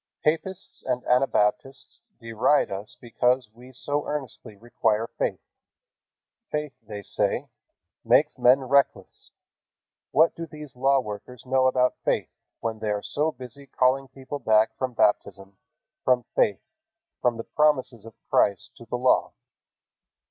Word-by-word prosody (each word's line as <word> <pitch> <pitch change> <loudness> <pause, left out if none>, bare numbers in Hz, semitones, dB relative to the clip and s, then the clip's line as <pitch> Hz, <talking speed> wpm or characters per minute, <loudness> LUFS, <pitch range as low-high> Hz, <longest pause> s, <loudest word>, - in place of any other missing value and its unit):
Papists 165 +4 -2
and 125 -1 -1
Anabaptists 125 0 0 0.2
deride 115 +4 +1
us 105 +6 -6
because 125 +1 +1
we 125 +3 -15
so 145 +3 -3
earnestly 135 -7 -5
require 110 0 0
faith. - - -1 1.1
"Faith," 150 -2 -3
they 105 -2 -8
say, - - -1 0.5
"makes - - +3
men 130 +3 +5
reckless." 140 +2 0 0.8
What 160 +2 +4
do 165 0 -6
these 150 -4 -11
law 135 +2 +3
workers 110 +3 -9
know 130 0 +3
about 125 -1 +2
faith, - - 0 0.3
when 110 -1 -3
they 110 - -3
are 105 -1 -1
so 150 +2 0
busy 130 +1 -11
calling 130 +1 +1
people 135 +2 -8
back 110 -3 +3
from 130 -1 -3
baptism, 100 -3 0 0.5
from 125 -1 +3
faith, 100 - +2 0.6
from 120 -2 +1
the 115 - -5
promises 130 -7 +1
of 115 -1 -13
Christ 100 - +2
to 120 - -12
the 125 - -2
Law? 125 +1 +2
125 Hz, 135 wpm, -25 LUFS, 115-135 Hz, 1.1 s, men